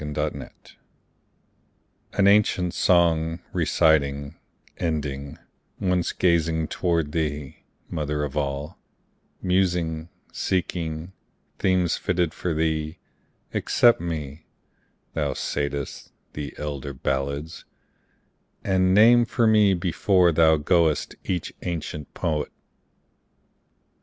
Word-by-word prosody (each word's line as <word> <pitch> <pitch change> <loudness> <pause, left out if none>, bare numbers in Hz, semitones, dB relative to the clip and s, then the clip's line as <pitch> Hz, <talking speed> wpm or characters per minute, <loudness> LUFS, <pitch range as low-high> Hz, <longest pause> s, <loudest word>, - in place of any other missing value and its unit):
Old 75 -1 -5
Chants 75 -2 -5 1.4
An 100 - +2
ancient 100 -4 +3
song, 85 -2 +3 0.2
reciting, 70 -2 +2 0.4
ending, 70 -4 -3 0.4
Once 90 -2 +1
gazing 80 -3 +1
toward 85 -4 0
thee, 75 -2 -3 0.3
Mother 75 -1 -2
of 70 -1 -4
All, 70 +3 -3 0.6
Musing, 85 -3 0 0.2
seeking 85 -1 -2 0.5
themes 90 -2 +2
fitted 90 -3 0
for 85 -3 -3
thee, 80 0 -1 0.6
Accept 120 -7 +3
me, 80 -3 -5 0.7
thou - - -1
saidst, 70 -1 -3 0.2
the 75 -1 -6
elder 70 -2 -5
ballads, 70 +4 -3 1.0
And 95 -1 +2
name 120 +3 +7
for 115 0 +1
me 105 -3 +5
before 90 +1 +2
thou 80 0 +5
goest 80 0 +2
each 90 -3 -2
ancient 75 -3 -5
poet. 75 -3 -1
80 Hz, 90 wpm, -24 LUFS, 75-90 Hz, 1.4 s, name